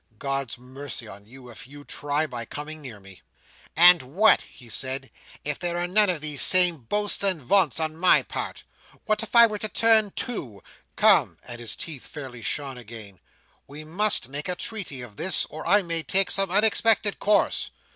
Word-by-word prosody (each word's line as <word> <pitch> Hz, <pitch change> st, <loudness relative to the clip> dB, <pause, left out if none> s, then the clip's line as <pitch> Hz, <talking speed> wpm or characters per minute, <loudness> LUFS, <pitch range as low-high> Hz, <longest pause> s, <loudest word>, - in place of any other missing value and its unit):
"God's 135 Hz, -1 st, -3 dB
mercy 130 Hz, -1 st, -9 dB
on 100 Hz, 0 st, -12 dB
you, 125 Hz, +1 st, -14 dB
if 115 Hz, -, -12 dB
you 145 Hz, +1 st, -13 dB
try 145 Hz, +1 st, -2 dB
by 120 Hz, -5 st, -6 dB
coming 150 Hz, +6 st, -8 dB
near 120 Hz, -7 st, -10 dB
me!" 95 Hz, 0 st, -13 dB
she -, -, -10 dB
replied. -, -, -26 dB, 0.2 s
"And 175 Hz, -, -3 dB
what," 175 Hz, +13 st, +3 dB
he 125 Hz, -, -17 dB
said, 135 Hz, +3 st, -2 dB, 0.3 s
"if 150 Hz, 0 st, -4 dB
there 175 Hz, -1 st, -3 dB
are 175 Hz, -, -1 dB
none 205 Hz, +3 st, +2 dB
of 170 Hz, -5 st, -2 dB
these 150 Hz, -2 st, -1 dB
same 180 Hz, -2 st, +6 dB
boasts 205 Hz, -, 0 dB
and 190 Hz, -4 st, +1 dB
vaunts 165 Hz, +2 st, +2 dB
on 155 Hz, -1 st, -2 dB
my 180 Hz, +3 st, +4 dB
part? -, -, -6 dB, 0.4 s
What 215 Hz, -1 st, 0 dB
if 225 Hz, +1 st, -7 dB
I 235 Hz, 0 st, +10 dB
were 215 Hz, -2 st, -3 dB
to 215 Hz, -, -4 dB
turn 220 Hz, -2 st, +3 dB
too? 130 Hz, -, -5 dB, 0.3 s
Come!" -, -, +3 dB
and 120 Hz, -1 st, -8 dB
his 115 Hz, -, -4 dB
teeth 150 Hz, -6 st, -7 dB
fairly 130 Hz, -5 st, -9 dB
shone 135 Hz, +4 st, -4 dB
again. 110 Hz, -5 st, -11 dB, 0.5 s
"We 150 Hz, +2 st, -9 dB
must 180 Hz, -, +1 dB
make 145 Hz, +5 st, -5 dB
a 180 Hz, -, -2 dB
treaty 180 Hz, -, -5 dB
of 105 Hz, -4 st, -12 dB
this, 190 Hz, -, +1 dB
or -, -, -8 dB
I 205 Hz, 0 st, +4 dB
may 165 Hz, -1 st, -1 dB
take 190 Hz, +6 st, +1 dB
some 195 Hz, -1 st, +1 dB
unexpected 210 Hz, +1 st, +2 dB
course. 210 Hz, 0 st, +1 dB
150 Hz, 195 wpm, -24 LUFS, 130-195 Hz, 0.5 s, I